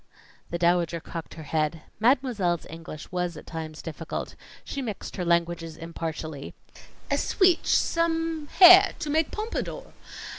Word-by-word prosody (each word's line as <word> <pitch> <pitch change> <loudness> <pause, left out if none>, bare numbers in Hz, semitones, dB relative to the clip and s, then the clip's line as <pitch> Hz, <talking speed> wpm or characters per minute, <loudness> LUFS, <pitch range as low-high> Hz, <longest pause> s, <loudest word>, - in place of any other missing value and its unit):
The 170 - -2
Dowager 170 -1 +2
cocked 165 0 -8
her 160 - -9
head. 155 +1 -1 0.2
Mademoiselle's 225 - +1
English 160 -1 -9
was 180 -2 -2
at - - -11
times 160 -1 -7
difficult. 165 0 -5 0.3
She 280 - -5
mixed 220 -6 -6
her 180 - -3
languages 170 -1 0
impartially. 160 -3 -6 0.6
"A - - +2
sweetch 365 -4 +2
some 325 -2 +1
hair 370 +3 +8
to 315 -3 -5
make 315 0 +2
pompadour. 460 +3 -5
175 Hz, 135 wpm, -26 LUFS, -, 0.6 s, hair